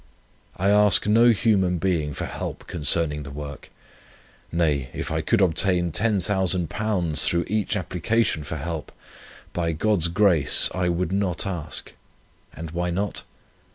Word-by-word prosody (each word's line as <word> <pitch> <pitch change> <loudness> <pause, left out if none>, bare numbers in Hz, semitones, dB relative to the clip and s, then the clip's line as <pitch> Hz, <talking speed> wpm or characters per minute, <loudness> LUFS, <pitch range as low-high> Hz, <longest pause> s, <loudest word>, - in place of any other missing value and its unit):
I 95 +2 +2
ask 105 -1 +4
no 115 +3 +5
human 100 -5 +2
being 85 -5 -1
for - - -4
help - - -6
concerning 75 0 +1
the 70 - -8
work. 70 0 -8 0.8
Nay, 75 -6 0
if - - -4
I 80 0 0
could 105 +7 +1
obtain 90 -1 +1
£10,000 95 -3 0
through 85 -1 +1
each 105 +2 -1
application 90 -1 -1
for 80 +2 -5
help; 80 +1 -5 0.6
by 85 -1 -1
God's 85 0 +1
grace, 85 -5 +4
I 90 -1 0
would 85 0 -1
not 95 -3 -1
ask. 85 -5 -5 0.6
And 80 0 -8
why 90 +1 -2
not? 100 +3 -3
90 Hz, 135 wpm, -24 LUFS, 80-100 Hz, 0.8 s, no